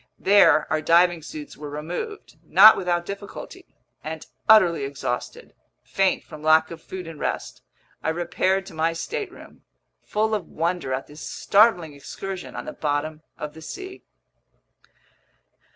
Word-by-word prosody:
There 170 -6 +5
our 155 - +1
diving 170 +1 +4
suits 150 -1 -9
were 150 0 -8
removed, 175 - -6
not 215 +3 +8
without 175 -2 -1
difficulty; 200 +1 -8 0.4
and - - -6 0.2
utterly 180 -9 +6
exhausted, 135 -3 -5 0.3
faint 195 -1 +1
from 155 -2 -11
lack 160 +1 +4
of 165 -1 -9
food 185 +1 -7
and 165 -2 -9
rest, - - -4 0.4
I - - -1
repaired 180 +3 0
to 195 - -11
my 160 +1 0
stateroom, 405 - -6 0.4
full 220 +1 0
of 205 -6 -2
wonder 170 -3 -2
at 130 +1 -2
this 150 +1 -13
startling 195 -7 +3
excursion 185 +6 -7
on - - -6
the 305 - -6
bottom 155 - -2 0.2
of 150 0 -6
the 160 - -12
sea. 380 - -8
170 Hz, 140 wpm, -24 LUFS, 155-195 Hz, 0.4 s, not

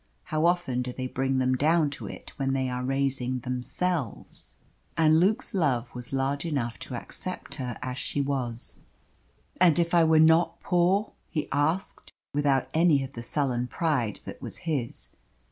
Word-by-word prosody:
How 155 +2 +1
often 175 -8 +1
do 125 0 -3
they 130 +1 -5
bring 135 +1 0
them 130 0 +2
down 155 +2 +3
to - - -7
it - - -9
when 135 -1 0
they 130 -1 0
are 125 0 -3
raising 130 -1 0
themselves! 125 - -3 0.4
And 160 -1 +5
Luke's 215 +8 +1
love 140 -10 +1
was 125 -1 -7
large 135 +1 0
enough 135 -8 -2
to - - -6
accept - - -6
her 125 -2 -4
as 130 0 -4
she - - -2
was. 130 -4 -2 0.8
"And 175 -3 +6
if 170 0 +1
I 170 -1 +6
were 160 0 +5
not 160 +1 +5
poor?" 185 +3 +2 0.2
he 155 - -2
asked, 155 +7 -1 0.2
without 140 -2 +2
any 160 -4 +4
of 135 +1 -7
the 120 - -6
sullen 125 -1 0
pride 130 - -1
that - - -8
was - - -6
his. 145 -8 -2
140 Hz, 165 wpm, -27 LUFS, 125-165 Hz, 0.8 s, And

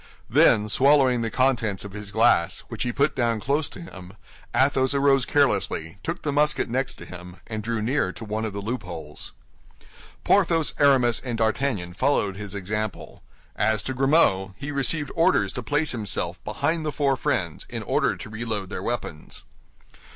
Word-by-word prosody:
Then, 105 0 +5
swallowing 130 +1 +4
the 115 - -1
contents 115 -6 0
of 100 - -8
his 105 0 -7
glass, 110 -5 +3
which - - -6
he 125 - +1
put 140 +4 +1
down 115 -3 +1
close 145 +6 0
to - - -10
him, 95 - -11 0.4
Athos 135 0 +2
arose 135 -2 +3
carelessly, 100 - +1
took 165 +1 -4
the 145 - 0
musket 150 +1 +2
next 130 +2 -2
to - - -11
him, 90 0 -10
and 110 -2 -5
drew 115 0 -2
near 125 -5 0
to 115 - -8
one 110 +1 -3
of 110 - -2
the 100 0 -6
loopholes. 90 -10 -6 0.9
Porthos, 165 -5 +3
Aramis 130 -5 +4
and 120 -3 -4
D'Artagnan 110 -5 0
followed 100 -3 +1
his 100 0 -7
example. 105 +2 -4 0.3
As 110 0 +1
to 130 - -3
Grimaud, 125 - +2
he 140 +1 -5
received 145 +2 -1
orders 110 - +2
to 125 - -4
place 150 +5 0
himself 95 -6 -3
behind 155 +9 -1
the 155 - -2
four 140 -2 +1
friends 90 - -2
in - - -5
order - - +1
to - - -8
reload 110 -3 -4
their - - -4
weapons. 85 -10 -5
115 Hz, 170 wpm, -24 LUFS, 100-140 Hz, 0.9 s, Then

